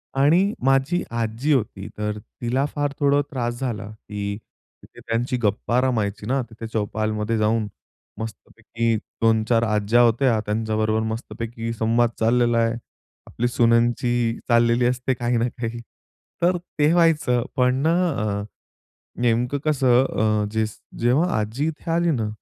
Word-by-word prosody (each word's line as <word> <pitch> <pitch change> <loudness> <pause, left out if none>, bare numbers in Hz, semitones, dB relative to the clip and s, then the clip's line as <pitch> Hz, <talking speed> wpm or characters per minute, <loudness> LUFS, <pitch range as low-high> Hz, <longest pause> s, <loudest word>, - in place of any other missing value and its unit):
आणि 170 +9 +3
माझी 135 +7 +2
आजी 115 +5 0
होती 105 -6 -1
तर 105 0 -2
तिला 125 +5 -2
फार 145 -1 -1
थोडं 145 0 +3
त्रास 120 -3 -3
झाला, 120 -7 -3 0.2
की 100 -1 -3 0.5
तिथे - - -16
त्यांच्या 120 +3 -1
गप्पा 110 +4 +1
रमायच्या 105 -5 -1
ना. 135 +2 +1
तिथे 115 0 -8
चौपालमध्ये 110 +1 -1
जाऊन, 110 0 +1 0.5
मस्तपैकी 115 +1 -3 0.3
2-4 115 +1 +3
आज्या 110 +1 +2
होत्या. 120 0 +3
त्यांच्याबरोबर 110 0 0
मस्तपैकी 115 +1 -5
संवाद 115 +1 +2
चाललेला 120 +1 +3
आहे. 115 0 +2 0.5
आपली 120 - -1
सु्नांची 120 0 +2
चाललेली 120 +1 +4
असते 125 +1 0
काही 120 0 -1
ना 115 +1 +1
काही. 120 -1 -5 0.6
तर 180 +1 +3 0.2
ते 150 +1 +4
व्हायचं 155 -8 +3
पण 125 0 +3
ना. 160 +1 +3 0.2
अ, 105 -6 -2 0.8
नेमकं 125 +3 +1
कसं 130 -4 +3
अ, 110 -4 +1
ज 110 0 +1 0.4
जेव्हा 130 +10 +2
आजी 110 +8 -2
इथे 160 +1 -6
आली 170 +1 +2
ना, 115 -8 0
120 Hz, 135 wpm, -23 LUFS, 110-130 Hz, 0.8 s, चाललेली